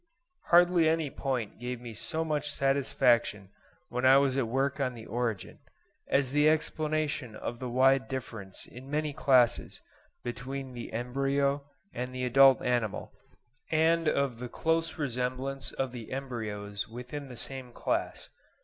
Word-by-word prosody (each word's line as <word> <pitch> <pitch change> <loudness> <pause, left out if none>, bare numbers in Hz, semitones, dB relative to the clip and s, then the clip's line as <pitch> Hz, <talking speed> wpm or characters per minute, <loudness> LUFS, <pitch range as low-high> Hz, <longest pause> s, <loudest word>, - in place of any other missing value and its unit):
Hardly 175 -2 +5
any 160 -3 0
point 125 -7 -3
gave 125 0 -4
me 120 -2 -8
so 160 +9 -2
much 150 -1 -1
satisfaction 125 -7 +2 0.4
when 125 +1 -3
I 130 +1 +8
was 140 -2 +3
at 135 -4 +1
work 135 +4 0
on 130 -3 -1
the 110 -1 -9
'Origin,' 115 -3 -3 0.5
as 135 -2 +2
the 150 +2 +5
explanation 155 -5 -1
of 120 +2 -5
the 125 -1 -4
wide 130 +2 +4
difference 115 -7 -6
in 130 +2 -12
many 150 0 -1
classes 130 -5 +3 0.4
between 130 +2 -5
the 120 -1 -7
embryo 140 +3 0 0.2
and 125 +1 -4
the 125 0 -1
adult 135 +1 +6
animal, 120 -4 -1 0.6
and 165 +1 +3
of 140 -5 +1
the 125 0 -5
close 165 +3 0
resemblance 130 0 -2
of 135 -2 -2
the 120 -3 -8
embryos 105 -6 -4
within 125 +5 -7
the 125 - -9
same 130 +1 -4
class. - - -2
130 Hz, 145 wpm, -30 LUFS, 120-140 Hz, 0.6 s, I